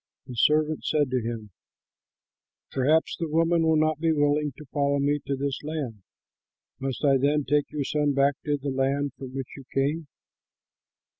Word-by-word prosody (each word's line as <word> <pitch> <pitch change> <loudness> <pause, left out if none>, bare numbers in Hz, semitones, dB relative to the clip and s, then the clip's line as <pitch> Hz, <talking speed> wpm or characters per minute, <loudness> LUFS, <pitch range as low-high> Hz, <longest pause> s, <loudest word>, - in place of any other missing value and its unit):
The 130 - -8
servant 155 +5 +2
said 145 -4 +1
to 130 -1 +1
him, 110 -2 -5 1.2
"Perhaps 150 +5 +2
the 165 -2 -2
woman 165 +2 +3
will 160 -1 +3
not 155 0 +2
be 165 0 +2
willing 145 -1 +2
to 150 - -10
follow 140 -1 +2
me 145 +1 +1
to 140 - 0
this 140 0 -2
land. 145 -9 -4 0.8
Must 135 +1 -2
I 135 -1 +5
then 145 +2 +2
take 145 +1 +2
your 150 -1 -2
son 145 +1 +1
back 140 +1 +4
to 145 -1 +1
the 140 0 -4
land 135 +2 0
from 130 -1 -8
which 135 -2 -5
you 135 - -10
came?" 145 +4 0
145 Hz, 170 wpm, -26 LUFS, 135-150 Hz, 1.2 s, I